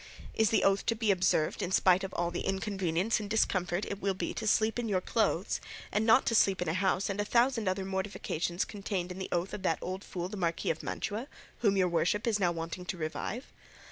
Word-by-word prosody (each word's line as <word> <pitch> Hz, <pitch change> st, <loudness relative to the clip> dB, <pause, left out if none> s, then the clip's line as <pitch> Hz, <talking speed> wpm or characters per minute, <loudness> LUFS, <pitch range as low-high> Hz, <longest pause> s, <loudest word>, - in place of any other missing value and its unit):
Is 220 Hz, -2 st, +3 dB
the 225 Hz, -, +2 dB
oath 195 Hz, 0 st, +3 dB
to 230 Hz, -, +2 dB
be 220 Hz, -2 st, +2 dB
observed 180 Hz, -4 st, +1 dB
in 180 Hz, -, -2 dB
spite 185 Hz, 0 st, +4 dB
of 195 Hz, -, -4 dB
all 175 Hz, 0 st, 0 dB
the 175 Hz, -, -3 dB
inconvenience 195 Hz, 0 st, 0 dB
and 205 Hz, -1 st, -6 dB
discomfort 185 Hz, -4 st, +1 dB
it 200 Hz, -, -5 dB
will 195 Hz, -1 st, 0 dB
be -, -, -3 dB
to 220 Hz, -, -4 dB
sleep 220 Hz, +2 st, +2 dB
in 235 Hz, -2 st, -2 dB
your 190 Hz, -2 st, +2 dB
clothes, -, -, 0 dB, 0.3 s
and 215 Hz, +2 st, +1 dB
not 250 Hz, +4 st, +6 dB
to -, -, +1 dB
sleep 195 Hz, -4 st, +4 dB
in 180 Hz, -, -2 dB
a 160 Hz, -, +1 dB
house, 190 Hz, +1 st, +1 dB
and 200 Hz, +1 st, -1 dB
a -, -, +1 dB
thousand 235 Hz, 0 st, +2 dB
other 190 Hz, +1 st, 0 dB
mortifications 190 Hz, -3 st, -2 dB
contained 195 Hz, -4 st, -4 dB
in 180 Hz, -, -7 dB
the 190 Hz, -, -4 dB
oath 175 Hz, +2 st, -1 dB
of -, -, -5 dB
that 165 Hz, -4 st, +1 dB
old 185 Hz, +2 st, -5 dB
fool 175 Hz, -1 st, -4 dB
the 205 Hz, +2 st, -7 dB
Marquis 170 Hz, -3 st, 0 dB
of 160 Hz, -, -5 dB
Mantua, 220 Hz, +6 st, -3 dB, 0.3 s
which 205 Hz, -4 st, +3 dB
your 185 Hz, -2 st, +3 dB
worship 175 Hz, +5 st, +1 dB
is 220 Hz, -3 st, +1 dB
now 180 Hz, -3 st, +2 dB
wanting 165 Hz, +2 st, -5 dB
to 180 Hz, -, -4 dB
revive? 170 Hz, -, -4 dB
190 Hz, 235 wpm, -31 LUFS, 180-210 Hz, 0.3 s, not